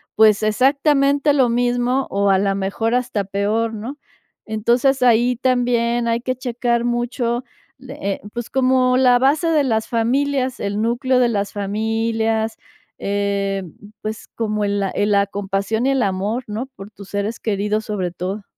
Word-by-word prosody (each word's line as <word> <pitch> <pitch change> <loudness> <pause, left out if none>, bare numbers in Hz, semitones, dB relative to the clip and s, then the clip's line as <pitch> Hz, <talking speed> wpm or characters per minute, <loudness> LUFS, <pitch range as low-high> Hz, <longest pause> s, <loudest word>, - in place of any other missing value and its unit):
pues 215 -1 +5
exactamente 275 +5 +3
lo 265 -4 +3
mismo 245 +2 +1
o 200 0 +1
a 195 - +5
la 195 0 +1
mejor 200 +4 -1
hasta 245 -5 0
peor, 205 +4 -1
¿no?, 230 +7 -6 0.5
entonces, 240 +5 +1
ahí 245 0 +4
también 240 -2 +1
hay 230 0 0
que 255 +1 -2
checar 240 -1 -1
mucho, 240 0 -1 0.4
le 265 0 -10 0.2
eh, - - -16
pues, 240 -1 -5
como 255 -1 +3
la 250 -1 +5
base 280 +6 +2
de 315 -3 +3
las 220 -4 0
familias, 260 +3 0
el 205 +1 -2
núcleo 245 +3 +1
de 245 -1 +3
las 205 -3 -1
familias, 220 +2 -1 0.4
em, 200 -3 -2 0.3
pues 215 0 -5
como 215 -2 -1
el 200 0 0
la 195 -1 0
el 205 +1 0
la 200 -1 +4
compasión 200 +3 -2
y - - +3
el 265 -2 +2
amor, 200 +5 -1
¿no?, 220 +5 -4
por 195 +2 -11
tus 200 -2 -13
seres 205 +3 -3
queridos, 210 0 -1
sobre 190 -5 -2
todo. 190 +4 -5
230 Hz, 160 wpm, -20 LUFS, 205-250 Hz, 0.5 s, pues